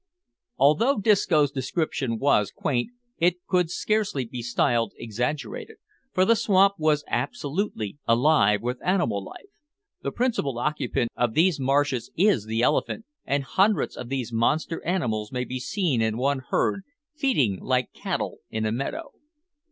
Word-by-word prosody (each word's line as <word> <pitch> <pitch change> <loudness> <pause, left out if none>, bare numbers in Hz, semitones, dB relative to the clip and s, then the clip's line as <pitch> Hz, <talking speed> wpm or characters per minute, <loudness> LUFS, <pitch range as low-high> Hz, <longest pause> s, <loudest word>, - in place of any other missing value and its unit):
Although 155 - +4
Disco's 185 -9 +3
description 135 -3 -2
was 110 -6 +2
quaint, 125 - -1 0.3
it 175 +1 +1
could 180 -3 +1
scarcely 200 - 0
be 120 +1 -6
styled 115 -2 +1
exaggerated, 120 +6 -4 0.3
for 185 - +3
the 230 - +5
swamp 195 -2 +4
was 155 -1 +2
absolutely 140 - -3
alive 115 -4 +4
with 125 +1 -3
animal 175 - +1
life. 95 - -11 0.6
The - - -3
principal 230 - -1
occupant 130 -3 -1
of 120 -2 0
these 165 -1 +3
marshes 135 -2 +1
is 185 - +3
the 110 +2 -1
elephant, 225 - 0 0.2
and 140 0 0
hundreds 195 +9 +1
of 125 - -7
these 130 -3 -3
monster 155 +8 0
animals 115 - -1
may 125 -1 -2
be 130 +1 -5
seen 145 - 0
in 110 0 0
one 135 +2 +1
herd, 195 - +1 0.3
feeding 230 - +1
like 125 -1 -1
cattle - - -3
in 110 0 -2
a 110 - 0
meadow. 210 - -4
140 Hz, 145 wpm, -25 LUFS, 120-180 Hz, 0.6 s, the